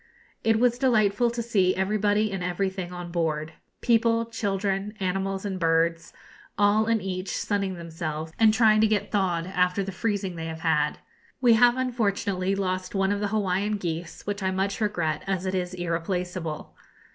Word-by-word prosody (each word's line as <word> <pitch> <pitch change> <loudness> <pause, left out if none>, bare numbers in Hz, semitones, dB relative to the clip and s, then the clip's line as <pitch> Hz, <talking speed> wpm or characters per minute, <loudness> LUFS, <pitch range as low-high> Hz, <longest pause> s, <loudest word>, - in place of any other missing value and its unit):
It 225 0 +3
was 245 0 +2
delightful 230 -3 +3
to 235 0 -3
see 195 -5 +2
everybody 210 +2 +1
and 190 -2 -3
everything 185 0 -2
on 175 -1 -7
board 160 -2 -1 0.3
people, 230 -1 +3
children, 200 -2 -2
animals, 195 +1 -2
and 190 -2 -3
birds, 165 0 +1 0.5
all 210 +2 +3
and 230 -1 +2
each 185 -1 -3
sunning 200 -2 -1
themselves, 160 -2 -5
and 220 -1 +6
trying 215 -1 +4
to 220 - +5
get 205 -1 -1
thawed 180 -5 0
after 180 +1 +1
the 195 - -5
freezing 195 -2 -2
they 165 0 -4
have 160 0 -6
had. 150 -2 +1 0.4
We 245 -3 +5
have 240 +2 +5
unfortunately 200 -6 0
lost 185 -1 -2
one 195 0 +2
of 205 - 0
the 205 - 0
Hawaiian 205 0 0
geese, 170 -3 -5
which 205 0 -3
I 190 - +1
much 195 +3 -1
regret, 170 -8 0
as 190 -1 -1
it 185 - -1
is 180 -1 -2
irreplaceable. 175 -1 -3
195 Hz, 170 wpm, -26 LUFS, 180-210 Hz, 0.5 s, and